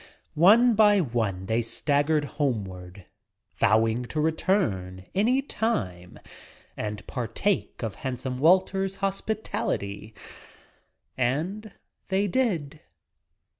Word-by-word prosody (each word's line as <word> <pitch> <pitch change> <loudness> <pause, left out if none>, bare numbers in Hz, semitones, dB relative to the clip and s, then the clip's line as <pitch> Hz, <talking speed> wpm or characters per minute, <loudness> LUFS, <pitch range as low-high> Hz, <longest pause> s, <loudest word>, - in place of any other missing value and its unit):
One 225 +9 +6
by 205 -1 +5
one 110 - -1
they 110 +4 +1
staggered 145 +5 0
homeward, 100 - -4 0.5
vowing 110 +3 +2
to 150 - -4
return 135 - 0
— - - -41
any 255 +4 +2
time 95 - -3 0.3
— - - -22 0.2
and 105 -1 -5
partake 130 - -2
of 110 -3 -2
handsome 125 0 -4
Walter's 190 +4 +3
hospitality. 190 - -3 1.0
And 170 - -2 0.3
they 195 +2 +1
did. 175 - -1
145 Hz, 95 wpm, -26 LUFS, -, 1.0 s, One